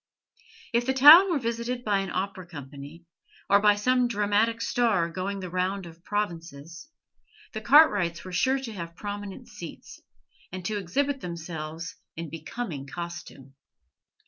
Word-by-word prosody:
If 240 +1 +1
the 265 - +1
town 310 +8 +10
were 340 - +1
visited 235 0 -3
by 205 -2 +2
an 195 -1 -3
opera 185 -1 -4
company, 145 +1 -10 0.5
or 200 - +7
by 205 0 +5
some 250 +4 +2
dramatic 215 +1 +1
star 225 -7 +1
going 195 +3 -4
the 185 - -6
round 185 +1 -1
of 170 - -10
the 165 - -26
provinces, 170 - -5 0.6
the 220 - -5
Cartwrights 205 - +4
were 185 - -7
sure 260 +9 +2
to 255 -4 -6
have 170 -3 -7
prominent 205 0 -7
seats, - - -10 0.5
and 185 -1 -7
to 215 +1 -1
exhibit 270 +9 -1
themselves 165 -1 -6 0.2
in 165 -2 -6
becoming 165 - -6
costume. 170 -5 -8
195 Hz, 145 wpm, -27 LUFS, 170-230 Hz, 0.6 s, town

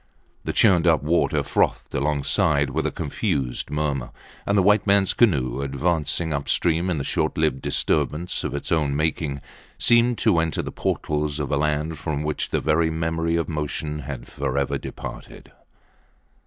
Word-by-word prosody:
The - - -1
churned 90 -5 +4
up 80 -4 +3
water 85 +3 +1
frothed - - 0
alongside 70 +1 +1
with - - 0
a - - -2
confused 65 -3 -2
murmur. 70 -4 -2 0.4
And 100 - +2
the 95 - +4
white 105 +2 +3
mans 100 -1 +4
canoe, 70 - +2
advancing 75 +3 0
upstream 80 +4 +1
in 85 - 0
the 70 - -2
short - - -1
lived 65 - +1
disturbance 85 +4 0
of - - -3
its 70 - -5
own 75 -4 +1
making, 75 -2 -1 0.4
seemed 120 0 +4
to 105 -7 +3
enter 80 -3 -1
the - - -5
portals 75 -1 -2
of 75 0 -3
a 70 - +2
land 75 +1 -1
from 75 -2 -3
which 75 0 -2
the - - 0
very 80 +1 +2
memory 80 +1 -1
of 85 -1 0
motion 75 0 -3
had 65 -3 -6
forever 70 0 -2
departed. - - -9
75 Hz, 160 wpm, -23 LUFS, 70-85 Hz, 0.4 s, churned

